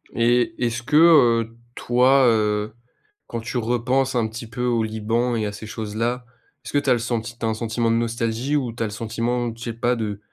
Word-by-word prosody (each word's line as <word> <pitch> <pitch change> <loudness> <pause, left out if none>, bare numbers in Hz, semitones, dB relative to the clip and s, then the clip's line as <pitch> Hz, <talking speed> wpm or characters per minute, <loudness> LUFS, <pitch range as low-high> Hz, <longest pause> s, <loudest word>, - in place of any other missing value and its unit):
Et 120 +5 +2
est-ce 120 0 -1
que, 150 - -2
heu, 120 -9 +5 0.2
toi, 130 +2 +3
heu, 105 -1 +1 0.5
quand 115 - -5
tu 120 +3 -4
repenses 125 +3 0
un 115 -2 +1
petit 115 +1 -8
peu 115 +3 -5
au 120 -2 +1
Liban 115 +3 -1
et 110 - -1
à 105 - -2
ces 105 +1 -9
choses-là, 115 +3 -3 0.4
est-ce - - -8
que - - +3
tu 140 - -2
as - - +6
le 120 - 0
senti 115 0 -3
tu 115 - -4
as - - +1
un 110 - 0
sentiment 115 +1 -1
de - - +2
nostalgie? 115 +3 -1
Ou, 130 -5 -1
tu 115 - -3
as - - -1
le - - -7
sentiment, 115 +2 -2
je 115 - -10
sais 115 - -4
pas 120 +2 0
de 105 -3 -4
115 Hz, 225 wpm, -22 LUFS, 110-125 Hz, 0.5 s, as